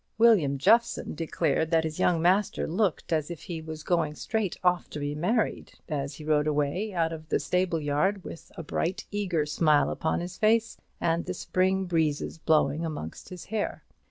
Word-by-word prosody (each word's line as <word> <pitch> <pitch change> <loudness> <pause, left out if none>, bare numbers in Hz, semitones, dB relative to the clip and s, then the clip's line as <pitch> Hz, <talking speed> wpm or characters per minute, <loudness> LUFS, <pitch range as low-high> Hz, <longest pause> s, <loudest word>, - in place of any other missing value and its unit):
William 205 -12 +5
Jeffson 230 - +3
declared 160 -1 0
that 165 -1 +3
his 155 -1 -4
young 165 -2 +2
master 190 +3 +2
looked 180 -1 0
as 155 -1 0
if 170 -3 -7
he 170 -4 -5
was 160 -1 -7
going 160 -4 0
straight 220 -1 -2
off 180 -1 +2
to - - -7
be 145 0 -2
married, 210 +10 -1
as 140 -3 -3
he 150 - -10
rode 150 -1 +2
away 150 +8 0
out 165 -3 0
of 155 0 -9
the - - +2
stable 180 -2 0
yard, 155 +7 0
with 165 - -10
a 165 - -5
bright 170 +4 -2
eager 185 -7 0
smile 150 -2 +3
upon 160 - -1
his 175 +1 -6
face 225 +1 +3 0.2
and 170 0 0
the 180 - -3
spring 190 +2 +1
breezes 160 -2 -1
blowing 155 -1 +2
amongst 150 - -6
his 180 -2 -9
hair. 215 -2 -2
165 Hz, 185 wpm, -27 LUFS, 155-185 Hz, 0.2 s, William